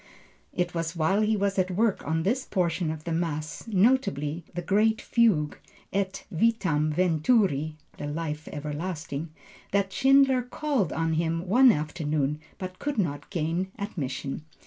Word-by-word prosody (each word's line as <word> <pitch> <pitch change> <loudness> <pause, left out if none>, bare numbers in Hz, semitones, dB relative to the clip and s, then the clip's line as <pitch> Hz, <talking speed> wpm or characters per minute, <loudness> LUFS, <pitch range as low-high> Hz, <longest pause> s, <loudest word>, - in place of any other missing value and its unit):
It 175 -1 -1
was 165 0 -2
while 190 +6 +2
he 215 0 +2
was 200 -1 0
at 185 0 +2
work 205 +3 +1
on 160 +1 0
this 245 +8 +1
portion 175 -3 0
of 155 -1 -5
the 170 - -4
Mass, 160 -2 -2
notably 185 - +2
the 175 - -3
great 215 +4 +3
fugue, 200 -11 +2 0.3
et 195 -1 -2
vitam 170 -6 +2
venturi 160 - +2 0.2
(the 145 - -4
life 150 0 -4
everlasting), 150 +1 -4 0.4
that 195 -1 +1
Schindler 270 -1 +5
called 250 - -1
on 165 0 0
him 165 +2 0
one 250 +6 +7
afternoon, 150 -3 -1 0.2
but 185 -1 -7
could 290 -2 -2
not 155 -8 -1
gain 170 +3 -1
admission. 145 - -4
175 Hz, 145 wpm, -27 LUFS, 155-205 Hz, 0.4 s, one